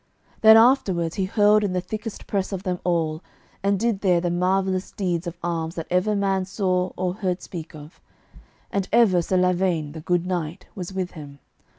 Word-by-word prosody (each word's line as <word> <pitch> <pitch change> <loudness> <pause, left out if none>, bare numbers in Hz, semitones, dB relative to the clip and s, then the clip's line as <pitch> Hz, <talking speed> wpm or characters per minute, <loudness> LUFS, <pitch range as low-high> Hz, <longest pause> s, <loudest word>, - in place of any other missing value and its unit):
Then 220 0 +9
afterwards 195 -9 +3
he 190 - +1
hurled 210 +1 +4
in 195 -3 -1
the 180 - +1
thickest 215 +4 -6
press 195 -1 -2
of 190 -1 -4
them 180 -2 -2
all, 165 -3 0 0.4
and 200 0 +1
did 230 -3 0
there 180 -3 +3
the 175 0 -1
marvellousest 185 +1 0
deeds 175 -3 -2
of 170 0 -6
arms 165 -1 -2
that 165 - -4
ever 185 +4 +2
man 195 -2 0
saw 185 -2 -1
or 180 -1 -1
heard 185 -2 -2
speak 165 -2 -8
of; 150 +1 -13 0.7
and 200 -2 -2
ever 215 -6 +4
Sir 185 +2 0
Lavaine, 180 -4 +1
the 160 +1 -8
good 175 +2 0
knight, 175 -1 -3
was 180 -1 -6
with 185 -1 -3
him. 145 -3 -10
185 Hz, 190 wpm, -23 LUFS, 175-195 Hz, 0.7 s, Then